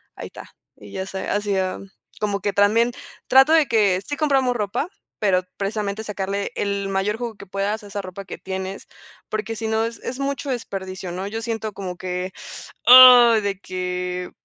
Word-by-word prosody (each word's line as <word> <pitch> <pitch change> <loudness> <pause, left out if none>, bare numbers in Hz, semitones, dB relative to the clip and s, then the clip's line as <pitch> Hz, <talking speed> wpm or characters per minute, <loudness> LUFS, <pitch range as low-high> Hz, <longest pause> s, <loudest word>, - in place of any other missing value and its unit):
ahí - - -7
está, - - -13 0.2
y 105 -1 -13
ya 190 - -4
se 190 0 -5
hacía, 195 -2 -1 0.4
como 205 -1 -1
que 205 - -1
también 220 +4 +3 0.4
trato 265 +4 +6
de 315 -3 +5
que 200 -5 +2
sí 290 - -3
compramos 270 -5 +2
ropa, 210 - -2 0.3
pero 185 -3 +2
precisamente 205 +1 -3
sacarle 200 -1 -3
el 200 -1 -2
mayor 195 +3 -1
jugo 235 -2 -5
que 200 - -12
puedas 200 +3 -2
a 205 - -11
esa 200 0 -5
ropa 190 +1 -9
que - - -8
tienes, 190 +1 -6 0.4
porque 220 +1 -3
si 225 0 -4
no 220 0 +1
es 230 0 -6
es 255 +2 -6
mucho 275 0 -3
desperdicio, 190 -6 -5
¿no?, 185 +2 -4
yo 225 +2 -5
siento 225 -2 -4
como 185 -2 -6
que, 180 0 -4 0.6
ay, 245 -2 +10
de 200 -1 -3
que 180 -1 -4
205 Hz, 180 wpm, -22 LUFS, 190-225 Hz, 0.6 s, ay